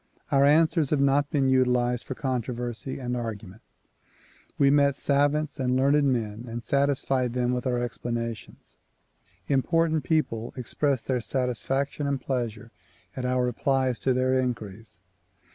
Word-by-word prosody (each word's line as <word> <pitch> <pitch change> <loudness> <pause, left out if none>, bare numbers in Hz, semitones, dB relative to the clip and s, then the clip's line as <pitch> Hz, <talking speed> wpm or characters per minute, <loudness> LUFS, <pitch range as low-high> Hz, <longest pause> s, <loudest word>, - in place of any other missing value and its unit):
Our 140 0 +5
answers 155 0 +3
have 150 - +1
not 140 +1 +2
been 140 -3 +1
utilized 125 -2 +2
for 130 - -5
controversy 125 -1 -3
and 125 -2 -3
argument. 110 -4 -6 1.0
We 140 -1 +4
met 140 -1 +4
savants 145 +2 +1
and 125 -1 +1
learned 140 +3 +3
men 110 -1 -3
and 115 0 -6
satisfied 135 -3 +1
them 125 0 0
with 125 +1 -2
our 125 -1 0
explanations. 115 -2 -5 0.7
Important 160 +3 +1
people 120 -8 -1
expressed 130 +1 -1
their 125 -2 0
satisfaction 135 +4 -2
and 140 -1 -1
pleasure 115 -4 -4 0.4
at 130 - -4
our 125 0 +1
replies 130 +1 0
to 135 - +1
their 130 +1 +1
inquiries. 115 -6 -3
130 Hz, 135 wpm, -26 LUFS, 120-140 Hz, 1.0 s, Our